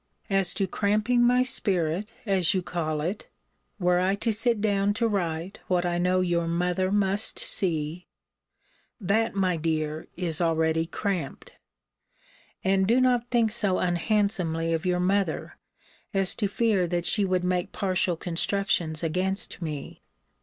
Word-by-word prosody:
As 195 -2 +1
to 195 +1 0
cramping 210 +6 +1
my 250 +1 +4
spirit, 190 -4 0
as 195 -2 +2
you 185 - 0
call 155 -4 -2
it, 180 +7 -4 0.5
(were 180 -1 +2
I 190 +2 +1
to 225 +2 0
sit 230 +1 +2
down 205 -1 +1
to 230 0 +1
write 175 -3 -3
what 180 -2 +1
I 175 0 0
know 180 +1 +2
your 170 -2 0
mother 180 +2 0
must 200 0 +1
see,) 165 -1 0 0.9
that, 210 +2 0
my 185 -3 +1
dear, 155 -1 -2
is 175 -2 -1
already 160 -1 +1
cramped. 195 0 -4 1.1
And 190 -1 +2
do 235 +4 +4
not 245 -2 +2
think 230 -3 +2
so 205 -5 0
unhandsomely 175 -3 0
of 165 +3 -2
your 180 0 +1
mother, 195 +2 -1 0.6
as 195 -1 +3
to 210 - -1
fear 200 -3 +1
that 175 0 -1
she 205 +5 +4
would 185 -2 0
make 180 +1 -1
partial 185 -2 0
constructions 170 -2 -1
against 185 +4 -2
me. 150 -4 -6
185 Hz, 145 wpm, -26 LUFS, 170-205 Hz, 1.1 s, my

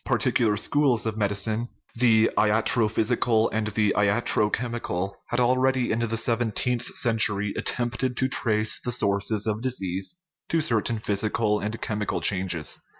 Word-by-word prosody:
Par - - +1
ticular 110 -4 +1
schools 130 +1 +1
of 110 -1 -2
medicine 110 +3 -1 0.3
the 115 -2 +3
latrophysical 110 +1 +2
and 110 0 -1
the 105 -1 +1
latrochemical 105 -1 0 0.2
had 120 - -2
already, 130 +1 +2
in 110 - 0
the 115 -1 -1
seventeenth 120 +1 0
cen 115 -3 +1
tury, 105 -1 0
attempted 120 +1 -2
to 130 - +2
trace 110 -4 +1
the 125 - -3
sources 100 -2 +1
of 110 0 -2
disease 100 - -2 0.3
to 165 - +1
certain 115 -5 0
physical 105 0 0
and 110 +2 -4
chemical 105 -2 -2
changes. 90 -5 0
110 Hz, 140 wpm, -25 LUFS, 105-120 Hz, 0.3 s, the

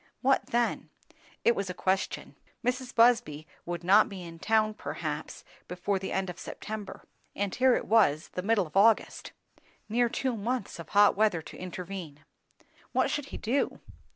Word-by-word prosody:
What 270 +1 +3
then? 240 0 0 0.6
It 235 - +5
was 195 -1 -3
a 180 - -4
question. 190 +1 -1 0.3
Mrs. 250 0 -2
Busby 230 -11 +3 0.2
would 175 0 -4
not 200 +5 +5
be 190 -3 -7
in 165 -1 -10
town 215 +2 +2
perhaps 155 -7 -5 0.2
before 180 +3 -2
the 190 - -5
end 190 0 -1
of 180 0 -7
September; 215 -2 -7 0.3
and 200 -1 -2
here 255 0 +4
it - - -2
was 190 -9 +3
the 180 - -4
middle 205 0 +2
of 155 - -15
August. 215 +3 +3 0.6
Near 235 +2 +2
two 255 +1 -1
months 225 -2 -3
of 170 - -9
hot 205 0 +5
weather 200 -6 +2
to - - -11
intervene. 180 -4 -7 0.7
What - - +2
should 290 - -2
he - - -7
do? 255 +6 -1
200 Hz, 165 wpm, -29 LUFS, 180-230 Hz, 0.7 s, It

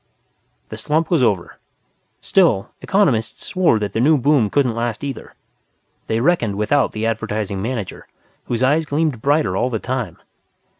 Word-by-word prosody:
The - - -7
slump 155 +3 0
was 165 -5 +3
over. 100 -8 0 0.6
Still, 165 - +2
economists 135 - 0
swore 180 - +2
that 105 -2 -3
the - - -1
new 150 +6 +4
boom 135 -4 +2
couldn't 130 -2 +1
last 115 +1 -3
either. 135 -4 -6 0.7
They 110 - 0
reckoned 120 - +1
without 125 +6 +1
the 110 +1 -3
Advertising 105 -3 -2
Manager, 110 -4 -5 0.4
whose 120 +1 -2
eyes 150 +4 +2
gleamed 145 -5 -1
brighter 140 -9 +1
all 120 +6 +1
the 115 - -1
time. 120 -6 -4
120 Hz, 150 wpm, -20 LUFS, 110-150 Hz, 0.7 s, new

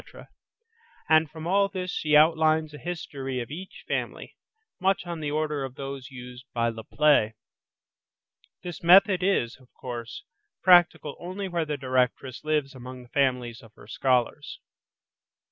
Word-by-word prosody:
and 160 -1 +4
from 160 +2 -9
all 195 +3 +3
this 185 -2 -4
she 150 -1 +1
outlines 155 0 +4
a 150 - -9
history 140 -7 -5
of 120 +2 -6
each 185 +5 -9
family, - - -4 0.4
much 190 -1 +1
on 170 -1 -5
the 150 -2 -3
order 150 -1 -1
of 130 -1 -6
those 135 -1 -7
used 125 -1 -10
by 115 0 +2
Le 115 -1 -7
Play. 140 -6 +3 1.3
This 175 -4 -7
method 185 +2 +6
is, 180 -11 +1
of 130 -1 -23
course, 120 -2 -7 0.4
practical 175 -5 +5
only 185 +3 -5
where 170 -3 -1
the 150 -1 -3
directress 130 0 -1
lives 150 -3 0
among 130 0 -9
the 120 - -18
families 125 -4 0
of 110 -2 -18
her - - -15
scholars. 125 +5 -1
150 Hz, 145 wpm, -26 LUFS, 125-170 Hz, 1.3 s, method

